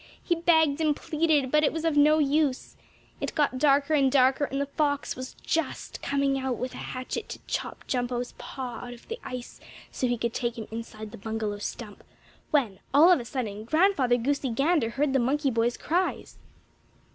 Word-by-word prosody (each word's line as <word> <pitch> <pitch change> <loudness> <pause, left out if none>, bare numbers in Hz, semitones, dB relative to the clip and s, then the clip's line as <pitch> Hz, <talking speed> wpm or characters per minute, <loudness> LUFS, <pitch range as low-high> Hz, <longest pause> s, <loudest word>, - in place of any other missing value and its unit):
He 345 - +1
begged 320 -3 +3
and 305 -2 +2
pleaded, 305 -5 +1
but 300 0 +4
it - - +3
was 325 0 -4
of 325 -2 +1
no 300 +1 +6
use. 290 -2 +1 0.4
It - - -4
got 285 -4 +1
darker 280 +1 +3
and 275 -3 +4
darker, 265 +1 +4
and 275 0 -3
the 280 - 0
fox 285 0 -1
was 255 +1 -7
just 330 -1 -2
coming 275 -1 +1
out 260 -2 -2
with 255 +1 -4
a - - -8
hatchet 255 0 -5
to - - -7
chop - - -4
Jumpo's 245 -1 -2
paw 255 -2 -6
out 245 0 -7
of 235 - -19
the 460 +1 -4
ice, 250 -1 -7 0.3
so 255 - -1
he 245 0 0
could 235 0 -2
take 235 -1 -2
him 220 - -6
inside 220 -1 -7
the 230 - -10
bungalow 215 -1 -3
stump, 210 0 -7 0.5
when, 235 -11 +1 0.2
all 325 +5 +8
of 355 - +5
a 240 - -6
sudden, 215 -5 -4
Grandfather 290 - +3
Goosey 275 +2 -1
Gander 275 +1 +2
heard 275 +3 0
the 270 - +3
monkey 275 +3 +1
boy's 230 +1 +1
cries. 355 +4 -2
270 Hz, 190 wpm, -27 LUFS, 240-300 Hz, 0.5 s, all